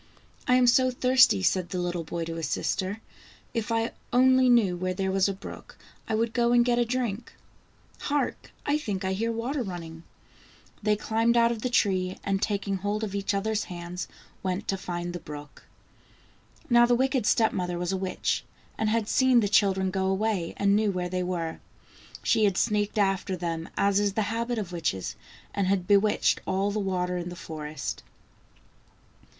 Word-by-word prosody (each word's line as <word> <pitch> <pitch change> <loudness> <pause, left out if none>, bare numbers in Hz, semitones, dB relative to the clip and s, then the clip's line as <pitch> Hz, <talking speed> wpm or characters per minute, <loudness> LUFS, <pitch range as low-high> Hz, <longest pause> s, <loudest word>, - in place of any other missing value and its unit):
" - - -28
I 250 - +5
am 255 0 +5
so 255 +2 +5
thirsty," 255 - +4
said 185 - +1
the 185 - -3
little 175 -1 -2
boy 165 +1 -4
to 165 - -5
his 165 -3 -3
sister. 195 +4 -2 0.5
"If 230 0 -2
I 225 0 +1 0.2
only 255 +1 +5
knew 220 -7 +4
where 185 +1 -2
there 190 0 -1
was 195 +1 +2
a - - +1
brook, 195 - -10 0.3
I 220 - 0
would 225 +1 0
go 240 -1 +2
and 240 0 +5
get 240 -1 +2
a 240 - +3
drink. 235 -2 -3 0.7
Hark! 290 0 -2 0.2
I 290 +1 +1
think 200 -8 -3
I 190 - 0
hear 225 +4 -1
water 245 +5 -2
running." 170 -6 -6 0.8
They 210 0 +2
climbed 225 +3 +1
out 235 0 +5
of 230 -2 -4
the 250 - -1
tree, 185 -6 +1
and 195 -1 0
taking 200 -2 -1
hold 205 +3 -2
of 205 -3 -3
each 200 0 -1
other's 215 +1 -1
hands, 175 0 -6 0.3
went 185 +1 -2
to 195 - +2
find 175 -2 -4
the 175 - -4
brook. 145 -2 -10 1.0
Now 240 -3 +6
the 245 - +4
wicked 260 -2 +1
step 220 -1 +3
mother 180 -1 -2
was 175 +1 -2
a - - 0
witch, 185 0 -1 0.4
and 220 - +1
had 225 -1 0
seen 260 +1 +4
the 210 - +2
children 190 -2 +3
go 190 0 0
away, 190 -3 -1
and 200 0 +3
knew 215 0 +2
where 180 -1 -3
they 185 0 -1
were. 175 -3 -3 0.6
She 220 -2 +3
had 195 -3 +1
sneaked 210 0 +1
after 195 -2 +1
them, 165 -1 -3
as 200 0 +3
is 205 -1 +1
the 220 - +1
habit 235 +1 -1
of 200 -5 -4
witches, 160 - -2 0.4
and 200 -2 0
had 190 -2 +1
bewitched 205 +1 +3
all 195 +2 +1
the 215 - -1
water 180 -2 -1
in 175 0 -4
the 175 - -7
forest. 155 -3 -6
200 Hz, 190 wpm, -27 LUFS, 180-230 Hz, 1.0 s, Now